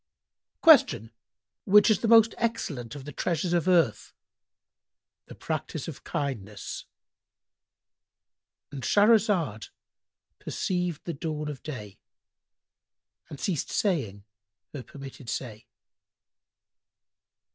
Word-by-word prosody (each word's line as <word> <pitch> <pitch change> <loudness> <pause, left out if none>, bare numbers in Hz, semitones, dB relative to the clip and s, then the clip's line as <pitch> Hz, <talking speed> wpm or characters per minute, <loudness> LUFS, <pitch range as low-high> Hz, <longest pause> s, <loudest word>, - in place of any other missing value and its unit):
Q 130 - +6 0.5
"Which 210 +2 +6
is 215 - +2
the 230 - -1
most 225 -1 +6
excellent 150 - -3
of 135 -2 -9
the 145 - -7
treasures 170 +4 -1
of 175 0 +1
earth?"—"The 170 - -4
practice - - -4
of - - -8
kindness."—And 130 +2 -10
Shahrazad 205 - +2 0.7
perceived 180 -4 -2
the 170 - -4
dawn 150 0 -4
of 145 -3 -7
day 105 -10 -8 1.3
and 145 - -9
ceased 170 -8 -2
saying 130 - -1 0.5
her 145 - -5
permitted 135 -2 -10
say. 110 -4 -5
150 Hz, 90 wpm, -27 LUFS, 125-190 Hz, 1.3 s, Q